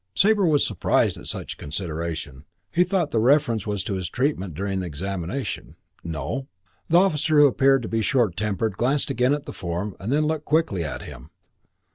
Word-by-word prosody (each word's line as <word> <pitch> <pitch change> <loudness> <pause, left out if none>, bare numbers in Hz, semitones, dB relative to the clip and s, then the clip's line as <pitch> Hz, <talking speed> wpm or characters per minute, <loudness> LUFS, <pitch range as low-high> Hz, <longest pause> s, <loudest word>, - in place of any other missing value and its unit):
Sabre 205 -2 +4
was 150 -3 +3
surprised - - +1
at - - -7
such - - -4
consideration. 80 -3 -5 0.3
He 175 - +4
thought 180 -4 0
the 115 - +2
reference 120 -4 +3
was 100 -2 -1
to 100 - -3
his 95 -3 -3
treatment 120 - -1
during 95 +1 -2
examination. 90 - -4 0.3
"No." 85 - -4 0.4
The 170 - +5
officer, 160 -4 +3
who 145 - +8
appeared 135 -1 +4
to - - -4
be 115 0 0
short 110 -5 +2
tempered, 105 +2 -1
glanced 135 +4 +1
again 125 +3 +2
at 150 0 -7
the - - -7
form 90 +3 -4
and 100 +6 -4
then 150 +2 +2
looked 155 -1 -2
quickly 150 - +1
at 75 -4 -5
him. - - -10
115 Hz, 180 wpm, -24 LUFS, 90-145 Hz, 0.4 s, who